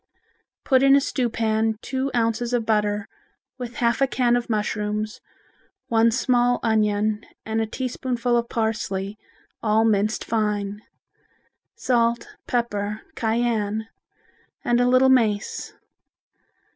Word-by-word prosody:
Put 260 -2 +4
in 275 0 +6
a - - +6
stew 255 -3 -1
pan 220 -1 0
two 265 +1 -2
ounces 235 +1 0
of 235 -2 +1
butter 210 -1 0 0.5
with 245 -1 -6
half 235 +1 +1
a 275 - +5
can 245 -2 +2
of 245 -1 -2
mushrooms, 210 0 -2 0.7
one 230 0 +4
small 245 0 +2
onion 215 -1 +1 0.2
and 220 0 -1
a 220 - -1
teaspoonful 245 0 -2
of 235 0 0
parsley, 210 -3 -2 0.4
all 220 0 +3
minced 215 0 +1
fine; 210 -2 -1 0.9
salt, 235 -1 +1 0.2
pepper, 215 -3 -1
cayenne 220 -1 -1 0.8
and 240 0 +3
a 245 - +3
little 255 +1 +5
mace. 220 -6 +1
225 Hz, 120 wpm, -23 LUFS, 215-245 Hz, 0.9 s, in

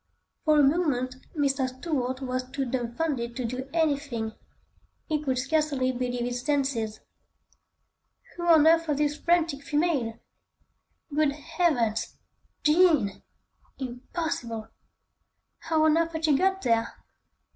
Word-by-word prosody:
For 305 -1 +5
a - - +6
moment, 270 -4 +1 0.2
Mr. 275 -2 +1
Stuart 260 -1 -3
was 255 -1 -3
too 275 0 -2
dumbfounded 240 0 -2
to 255 - -3
do 255 +3 -4
anything; 285 -9 0 0.7
he 305 -2 -1
could 265 -4 -1
scarcely 275 -1 +1
believe 245 -1 -2
his 245 0 -3
senses. 265 -7 -1 1.3
Who 345 0 -4
on 320 -3 +7
earth 330 0 +5
was 295 -2 0
this 295 0 +1
frantic 330 -3 +1
female? 290 -7 0 1.0
Good 295 -1 +2
Heavens! 280 - 0 0.5
Jean! 300 - +4 0.6
Impossible! 245 -3 -4 0.9
How 320 -1 +1
on 310 0 +5
earth 330 0 +1
had 320 0 -1
she 300 -3 +4
got 385 +5 +1
there? 230 -1 +1
280 Hz, 120 wpm, -27 LUFS, 250-315 Hz, 1.3 s, on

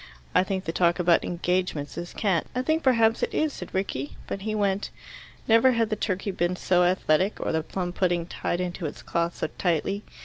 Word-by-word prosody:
I 180 - +5
think 190 0 -3
the 165 - -1
talk 170 0 +2
about 175 -2 +3
'engagements' 175 -4 -1
is 175 +1 -5
cant." 190 -7 0
"I 255 - 0
think 315 +4 +1
perhaps 230 -4 +3
it - - 0
is," 310 -2 +1
said - - -8
Rickie. 145 -8 -3
But 195 - -5
he 215 +1 -2
went. 200 -1 0 0.6
Never 230 +3 +6
had 230 -2 +1
the - - +2
turkey 200 -1 -2
been 175 -1 0
so 180 0 +2
athletic, 185 +1 +2
or - - -1
the 160 - +1
plum 175 +2 -4
pudding 175 -2 +1
tied 175 0 -3
into 180 -2 -3
its - - -9
cloth 170 0 -1
so - - -1
tightly. 180 +4 0
185 Hz, 205 wpm, -26 LUFS, 175-210 Hz, 0.6 s, Never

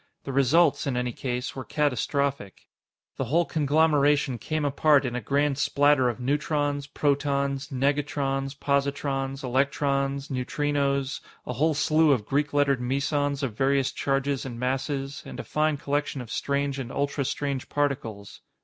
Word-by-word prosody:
The 135 - -5
results, 140 +4 +3
in 130 -3 -1
any 125 0 -1
case, 125 +1 -4
were 130 - -5
catastrophic. 140 - -1 0.5
The 135 - -1
whole 165 +8 +2
conglomeration 145 -4 +2
came 155 +3 -2
apart 145 0 +3
in 120 -1 -2
a 125 - -2
grand 140 +1 +1
splatter 140 -3 +3
of 120 - -5
neutrons, 145 +1 -1
protons, 140 -1 0
negatrons, 135 0 -1
positrons, 140 -1 -1
electrons, 140 +1 0
neutrinos 140 +1 -1 0.2
a 125 - -3
whole 155 +5 +1
slew 155 +1 +3
of 110 -6 -1
Greek 145 +3 0
lettered 140 -3 +2
mesons 140 +2 0
of 120 -6 -2
various 135 +1 +2
charges 135 0 -1
and 120 -3 -6
masses, 135 +2 -2
and - - -9
a - - -4
fine 155 -1 0
collection 145 0 -2
of 120 -3 -8
strange 140 -1 -1
and 125 -3 -5
ultrastrange 140 -1 -2
particles. 115 -9 -3
140 Hz, 140 wpm, -26 LUFS, 135-145 Hz, 0.5 s, results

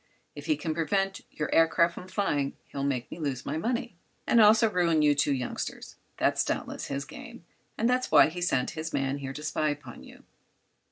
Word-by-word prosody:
If - - -9
he 310 - +3
can 160 -2 -3
prevent 195 +4 -1
your 150 - -4
aircraft 170 +1 +4
from 180 - -9
flying 150 -8 -1
he'll 140 - -4
make 130 -4 -2
me - - -7
lose 140 -5 -3
my 145 - -3
money 230 +1 -2 0.3
and 235 - +5
also 220 +2 +6
ruin 170 -6 +2
you 145 -1 +5
two 145 0 +1
youngsters. 130 -3 -4 0.2
That's - - +2
doubtless - - -3
his 140 +1 -3
game. 235 - -11 0.3
That's 250 +3 +1
why 155 -1 +7
he 175 +2 -7
sent 135 -8 +1
his 160 0 -5
man 135 +1 -1
here 135 -1 -5
to 150 - -8
spy 155 0 0
upon 145 0 -7
you." - - -15
160 Hz, 190 wpm, -28 LUFS, 140-190 Hz, 0.3 s, why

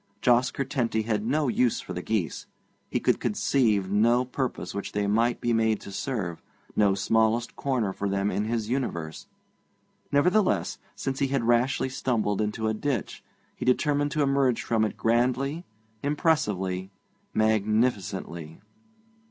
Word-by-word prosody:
Jos 125 +2 +4
Curtenty 125 -5 -1
had 105 -2 -1
no 145 +6 +1
use 125 -1 +2
for - - -7
the 90 - -4
geese; 100 -4 -2 0.4
he - - 0
could - - +2
conceive 105 -8 +1
no 115 +5 +3
purpose 130 0 -3
which 100 - -5
they 105 0 0
might 115 +4 +2
be 120 - 0
made 110 -1 +2
to 100 - -9
serve, 95 -6 -3 0.3
no 100 -2 +4
smallest 110 +3 +1
corner 125 -8 -1
for 100 +1 -2
them 100 +1 0
in 105 - -1
his 110 -1 -1
universe. 95 -11 -3 0.8
Nevertheless, 180 +8 +2 0.2
since 135 0 -3
he 140 - +2
had 135 -2 0
rashly 120 +3 +2
stumbled 115 -6 -1
into 110 +1 -1
a 110 - +1
ditch, 120 -1 -3 0.3
he - - -6
determined 145 +3 +2
to 150 - +2
emerge 135 -3 +2
from 115 -2 +1
it 105 - -4
grandly, 130 +8 +1 0.4
impressively, 105 - 0 0.5
magnificently. 105 -6 0
115 Hz, 145 wpm, -27 LUFS, 105-130 Hz, 0.8 s, Jos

